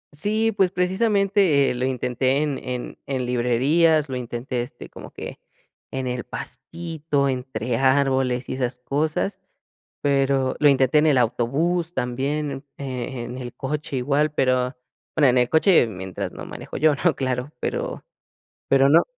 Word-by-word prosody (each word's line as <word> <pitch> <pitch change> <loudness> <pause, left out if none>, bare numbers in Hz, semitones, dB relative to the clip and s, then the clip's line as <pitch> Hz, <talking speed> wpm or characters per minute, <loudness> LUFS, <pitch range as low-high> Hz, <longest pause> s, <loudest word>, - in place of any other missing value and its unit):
Sí, 215 +7 +1
pues 195 -3 +2
precisamente, 190 -4 +2
eh, - - -1
lo 125 +1 -1
intenté 130 +2 0
en 145 -3 -2
en 125 -1 -5
en 130 -2 -1
librerías, 135 +6 +2
lo 130 - -3
intenté, 120 0 -3
este, 120 - -8
como - - -10
que - - -8 0.5
en 130 -1 -3
el 125 -1 -2
pastito, 160 0 -3
entre 125 -2 -2
árboles 130 -1 +2
y - - -3
esas 125 -1 -2
cosas, 155 +8 -1 0.6
pero 135 -2 +2
lo 150 - +5
intenté 135 +1 +4
en 155 - +4
el 145 -4 +4
autobús 155 +9 0
también, 135 +4 -1
eh, 135 +1 -7
eh, 130 -2 -4
en 120 +2 -6
el 120 -2 -7
coche 145 0 -4
igual, 145 +4 +1
pero 130 -1 +1 0.4
bueno, 145 -4 +5
en 125 0 +4
el 125 0 +3
coche 160 - +5
mientras 95 -3 -5
no - - -8
manejo - - -7
yo, 155 -1 +4
¿no?, 175 -4 +4
claro, 130 +1 -2
pero - - -3 0.6
pero 135 0 +5
no 165 +4 +6
135 Hz, 155 wpm, -23 LUFS, 125-155 Hz, 0.6 s, no